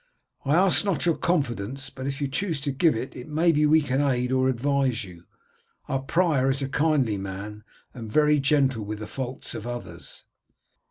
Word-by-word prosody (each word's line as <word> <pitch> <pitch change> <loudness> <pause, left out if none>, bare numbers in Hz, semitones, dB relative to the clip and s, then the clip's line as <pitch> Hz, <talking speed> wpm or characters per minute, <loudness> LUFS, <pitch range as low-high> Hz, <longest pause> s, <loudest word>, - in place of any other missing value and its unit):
I 140 +3 +3
ask 185 +2 +5
not 195 -5 0
your 170 -2 +3
confidence, 135 - -2
but 130 0 -6
if 140 0 -3
you 140 - -1
chose 165 +2 -2
to 140 0 -1
give 150 +3 +3
it 125 +1 -6
maybe 155 -1 +3
we 155 +1 +5
might 135 0 0
aid 125 +1 -1
or 130 0 +2
advise 130 -1 0
you. 90 -3 -12 0.6
Our 135 - -1
prior 150 -3 +2
is 135 +1 +1
a 135 - -3
kindly 140 -9 +1
man 100 +2 -7 0.3
and 115 -3 -8
very 150 +3 +4
gentle 135 -5 +2
with 105 +1 -5
the 110 - -6
faults 130 +2 -5
of 110 - -6
others." 120 0 -6
135 Hz, 180 wpm, -25 LUFS, 120-150 Hz, 0.6 s, ask